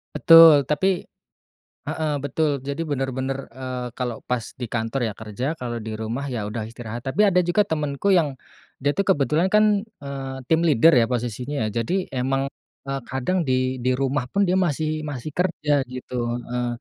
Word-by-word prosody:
Betul 165 -5 +8
tapi 180 +5 0 0.8
heeh, 155 -1 -1
betul, 145 -1 0
jadi 140 +1 -5
bener-bener, 135 -1 -3
eee, 130 -1 -5
kalau 125 -3 -3
pas 125 -2 0 0.2
di 120 - -3
kantor 115 +2 -1
ya - - -6
kerja, 110 +4 -4
kalau 120 -3 -4
di 110 0 -5
rumah 115 +6 -4
ya 120 -5 -3
udah 110 +2 -4
istirahat, 115 0 -7
tapi 190 +11 +2
ada 185 -3 +4
juga 175 +4 +2
temenku 150 +2 0
yang, 150 -7 +2 0.4
dia 145 +2 +1
tuh 200 - 0
kebetulan 160 0 +2
kan, 210 -1 +4
eee, 140 -10 -7
team 160 +4 +2
leader 165 -1 +5
ya 120 -3 +4
posisinya, 125 +1 -2
jadi 180 - -1 0.2
emang, 135 +1 0 0.4
eee, 135 0 -3
kadang 130 +9 0
di 130 0 0
di 125 +1 +1
rumah 135 -1 -1
pun 200 +5 +2
dia 180 - +1
masih 155 -3 0
masih 145 +1 -5
kerja 175 -4 -1 0.2
gitu, 125 0 -8 0.3
heeh. 125 0 -2
135 Hz, 170 wpm, -23 LUFS, 125-160 Hz, 0.8 s, Betul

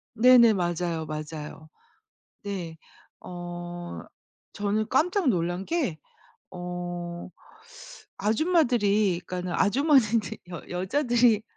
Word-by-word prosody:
네네. 235 -1 +7
맞아요, 175 -3 -1
맞아요. 155 0 -7 0.7
네. 180 -5 -5 0.4
어. 175 0 -7 0.5
저는 210 +1 0
깜짝 350 +4 +2
놀란 175 -1 -1
게 280 - -1 0.5
어. 175 -1 -6 0.9
아줌마들이 215 - +2
그러니까는 180 -1 -4
아주머니들 235 - +2
여 175 -3 -7
여자들이 235 +3 +2
190 Hz, 195 characters per minute, -26 LUFS, 175-235 Hz, 0.9 s, 네네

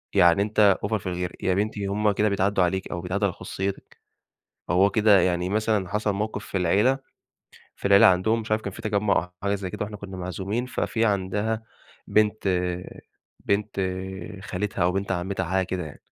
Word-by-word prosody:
يعني 90 0 +5
أنتَ 105 -1 +4
أوڤر 110 +2 0
في 95 - -8
الغيرة. 90 -1 -3
يا 95 - +2
بنتي 100 +1 -1
هم 105 +2 +1
كده 105 +1 +1
بيتعدوا 100 -1 +2
عليكِ، 95 +2 -1
أو 85 - -3
بيتعدوا 95 +4 -1
على 95 - -3
خصوصيتِك. 95 +3 -5 0.7
هو 95 +4 +4
كده 105 -1 +5
يعني 90 0 0
مثلًا 105 -2 0
حصل 105 +1 0
موقف 105 +2 -3
في - - -3
العيلة، 105 +9 +3 0.8
في - - -4
العيلة 100 0 +8
عندهم 95 +5 +3
مش 110 - -9
عارف 110 0 +1
كان 100 - -5
في - - -10
تجمع 105 -1 +1
أو 90 - -16
حاجة 100 0 +1
زي 95 -2 -4
كده - - -4
وإحنا 105 0 -7
كنا 100 -2 -8
معزومين، 95 +6 -3
ففي 115 -2 -1
عندها 105 +2 0 0.5
بنت 105 -1 +2 1.0
بنت 100 0 0 0.6
خالتها 100 -1 -3
أو 90 - +3
بنت 95 +1 -2
عمتها 95 +1 -2
حاجة 95 +2 0
كده 90 -1 -3
يعني، 70 - -12
100 Hz, 180 wpm, -25 LUFS, 95-105 Hz, 1.0 s, العيلة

